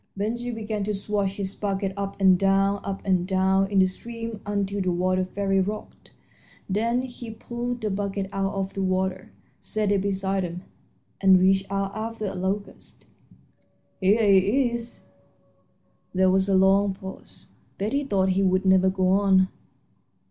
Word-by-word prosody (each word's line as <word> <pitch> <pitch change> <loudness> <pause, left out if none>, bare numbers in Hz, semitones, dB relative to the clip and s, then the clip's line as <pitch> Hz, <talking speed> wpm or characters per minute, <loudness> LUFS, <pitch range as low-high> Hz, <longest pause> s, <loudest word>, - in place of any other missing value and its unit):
Ben 210 +3 -1
Gile 240 0 -5
began 215 -2 -3
to 210 0 -1
swash 200 -1 -1
his 195 -1 -3
bucket 195 -1 -2
up 200 0 -5
and 190 -1 +6
down, 195 +1 +2
up 195 0 -5
and 185 -2 +1
down, 190 0 +2
in 200 - -1
the 190 - +6
stream 230 +3 -6
until 200 -1 -1
the 185 -1 0
water 185 +1 +1
fairly 195 +1 0
rocked. 205 +3 -5 0.6
Then 230 +5 0
he 245 -2 -8
pulled 240 +2 -5
the 215 -1 -1
bucket 195 0 -2
out 195 0 -1
of 195 0 -3
the 195 - -3
water, 185 0 -1 0.3
set 215 -2 -1
it 200 -2 +2
beside 195 0 -1
him, 175 0 -5 0.6
and 190 -1 +6
reached 190 +1 +3
out 195 0 -2
after 220 0 -4
a 195 - -3
locust. 195 +2 -5 0.9
"Here 205 +4 +3
he 205 +6 +4
is." 235 0 -6 1.1
There 185 0 +4
was 190 +1 +2
a 195 - +3
long 195 +1 +4
pause. 190 0 -10 0.3
Betty 235 +9 -1
thought 195 -8 +1
he 190 +1 +1
would 185 0 +2
never 190 0 +5
go 185 -1 +1
on. 190 -1 +4
195 Hz, 165 wpm, -25 LUFS, 190-210 Hz, 1.1 s, and